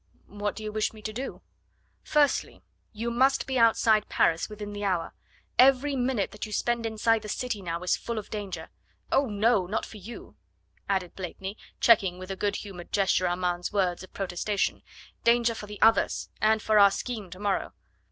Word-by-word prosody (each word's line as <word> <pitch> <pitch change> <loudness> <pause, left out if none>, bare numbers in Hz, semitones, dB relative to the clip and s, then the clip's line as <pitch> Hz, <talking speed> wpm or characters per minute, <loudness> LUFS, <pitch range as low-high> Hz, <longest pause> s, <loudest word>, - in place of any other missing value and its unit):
"What 205 +1 -4
do 215 - -7
you 215 - -4
wish 215 +1 -1
me 215 -1 -13
to 215 - -4
do?" 260 +4 -6 0.6
"Firstly, 295 -2 +1 0.3
you 230 +2 -3
must 265 +3 +3
be 260 -2 -1
outside 220 -2 +4
Paris 165 +5 +2
within 210 -1 -7
the 205 0 -5
hour. 180 -4 -1 0.5
Every 270 +2 +5
minute 250 -5 0
that 210 - -8
you - - -11
spend 235 +1 0
inside 225 0 +1
the 210 - -8
city 245 -2 -3
now 170 -1 -4
is 180 - +2
full 235 -1 -5
of 210 - -6
danger 205 -3 -5 0.4
oh, 275 0 +3
no! 210 -2 +2
not 210 +4 -2
for 220 - -11
you," 210 +4 -10 0.5
added 190 -3 -1
Blakeney, 190 +2 -6 0.2
checking 195 -6 +4
with 185 +1 -7
a - - -3
good 200 +1 -1
humoured 185 -5 -8
gesture 190 -2 +2
Armand's 175 0 -1
words 185 -4 0
of 185 - -11
protestation, 195 +2 -2 0.4
"danger 235 0 +4
for 210 -2 -8
the 210 0 -9
others 225 0 +3
and 220 0 +3
for 215 -1 +4
our 200 0 +8
scheme 210 -1 -5
tomorrow." 195 +3 -2
210 Hz, 180 wpm, -27 LUFS, 195-230 Hz, 0.6 s, our